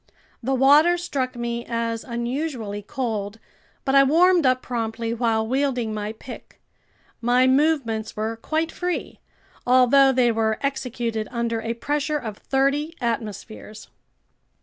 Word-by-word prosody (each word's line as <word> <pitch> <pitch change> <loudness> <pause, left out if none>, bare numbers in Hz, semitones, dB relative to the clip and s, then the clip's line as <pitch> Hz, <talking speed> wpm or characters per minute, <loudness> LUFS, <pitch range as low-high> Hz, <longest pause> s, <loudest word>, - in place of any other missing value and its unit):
The 265 +2 0
water 295 +7 +5
struck 270 -7 -3
me 235 0 -3
as 230 -1 -3
unusually 235 -3 -4
cold, 215 -2 -4 0.5
but 270 - +1
I 275 - +7
warmed 335 +3 +4
up 255 0 +2
promptly 230 -1 -3
while 225 -2 0
wielding 250 -2 -1
my 210 0 -4
pick. 240 +3 -12 0.6
My 245 +2 +3
movements 260 -6 +1
were 220 +1 -2
quite 315 +7 -2
free, 355 0 -4 0.4
although 255 +2 +5
they 250 -2 +3
were 220 -1 0
executed 240 -5 -2
under 235 -2 -2
a 230 +1 -3
pressure 295 +4 -1
of 220 -7 -7
thirty 280 +4 0
atmospheres. 220 -2 -5
245 Hz, 125 wpm, -23 LUFS, 225-275 Hz, 0.6 s, I